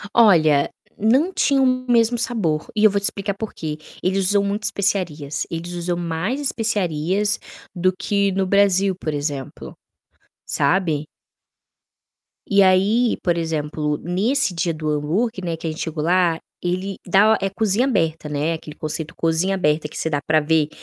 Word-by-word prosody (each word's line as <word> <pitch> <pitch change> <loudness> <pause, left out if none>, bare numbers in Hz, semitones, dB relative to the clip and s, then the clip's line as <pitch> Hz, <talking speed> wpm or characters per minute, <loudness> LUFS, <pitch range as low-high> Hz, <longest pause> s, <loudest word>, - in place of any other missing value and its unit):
Olha, 160 -11 +5 0.3
não 265 - +2
tinha 280 -5 +2
o 265 - +4 0.3
mesmo 235 0 +3
sabor, 190 -11 +2
e 215 - +1
eu 215 - +7
vou 200 - 0
te - - +3
explicar 200 0 -1
porquê. 165 -7 -6 0.2
Eles 190 +1 +1
usam 205 -1 +3
muito 200 +1 -2
especiarias, 160 -9 -1
eles 170 +1 -5
usam 175 0 -2
mais 175 - -2
especiarias 205 - 0 0.4
do 185 +1 +2
que 200 0 0
no 190 0 0
Brasil 195 0 +3
por 160 -3 -4
exemplo, 145 -2 -5 0.7
sabe. 150 0 0 1.4
E 200 -1 +4
aí 200 +6 +3
por 175 -2 +1
exemplo 150 -2 -2
nesse 200 - +1
dia 170 0 -1
do 155 -1 -4
hambúrguer, 180 +9 -1
né, 170 -1 -2
que 165 - -10
a - - 0
gente 155 - -7
chegou 160 -2 -3
lá, 175 -1 +2 0.2
ele 185 +2 -3
dá 205 +4 +4
é 195 - 0
cozinha 215 +4 +1
aberta, 165 - -1
né, 150 +2 -1
aquele 155 -2 -8
conceito 155 +1 -4
cozinha 165 +4 +1
aberta 150 -4 0
que - - -9
você 160 - -1
dá 145 -2 -1
para 155 +2 +2
ver, 155 0 +2
180 Hz, 160 wpm, -21 LUFS, 155-200 Hz, 1.4 s, eu